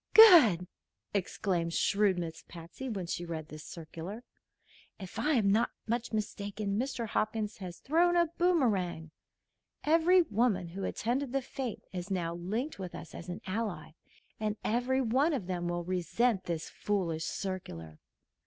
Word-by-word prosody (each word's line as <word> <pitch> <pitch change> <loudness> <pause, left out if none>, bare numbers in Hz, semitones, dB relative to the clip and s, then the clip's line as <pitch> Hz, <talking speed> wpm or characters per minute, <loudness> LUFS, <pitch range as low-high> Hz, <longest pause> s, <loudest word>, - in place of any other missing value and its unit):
"Good!" 310 - +9 0.5
exclaimed 180 -3 -1
shrewd 200 -2 +3
Miss 165 -1 -5
Patsy, 170 +10 -8
when 195 -6 -3
she 170 0 -3
read 160 -2 -5
this 155 0 -9
circular. 170 +7 -7 0.8
"If 195 +3 -7
I'm 230 -6 +3
not 225 +4 +3 0.2
much 235 +1 -2
mistaken, 205 -1 -2
Mr. 240 -3 -2
Hopkins 215 0 -1
has 180 -3 -7
thrown 345 +5 +3
a 345 0 +5
boomerang. 205 - +1 0.7
Every 335 +4 +5
woman 210 - +1
who 190 +3 -4
attended 250 +3 -1
the 275 - +1
fête 255 -2 -5
is 180 +1 -5
now 175 -3 -1
linked 210 - -3
with 185 -2 -6
us 170 - -9
as 170 - -8
an 175 - -5
ally, 190 -5 -3 0.5
and 215 0 -1
every 250 +4 +1
one 265 +7 +2
of 250 -10 -2
them 175 -1 -2
will 175 0 -2
resent 185 +4 0
this 165 -2 -3
foolish 170 -6 -1
circular." 85 - -5
200 Hz, 145 wpm, -31 LUFS, 175-245 Hz, 0.8 s, Good